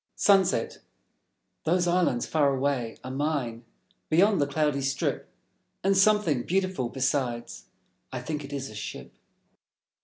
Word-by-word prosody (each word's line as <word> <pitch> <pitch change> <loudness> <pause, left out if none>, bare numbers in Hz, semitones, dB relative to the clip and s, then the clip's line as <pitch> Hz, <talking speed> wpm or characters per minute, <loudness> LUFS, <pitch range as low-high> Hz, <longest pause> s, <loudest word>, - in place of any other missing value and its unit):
Sunset 195 -2 +3 0.8
Those 175 +2 +2
islands 175 -9 +2
far 145 -3 +2
away 130 -4 -1
are 130 - -6
mine, 130 -5 -2 0.4
Beyond 190 +3 +4
the 140 - +2
cloudy 145 -1 0
strip; 135 +1 -2 0.5
And 195 +1 +3
something 195 -9 +3
beautiful, 185 -5 -1
besides: 130 -3 -2 0.5
I 130 - -4
think 150 +4 -4
it 140 - -9
is 140 -1 -4
a - - -11
Ship. 105 0 -7
145 Hz, 125 wpm, -27 LUFS, 130-175 Hz, 0.8 s, Beyond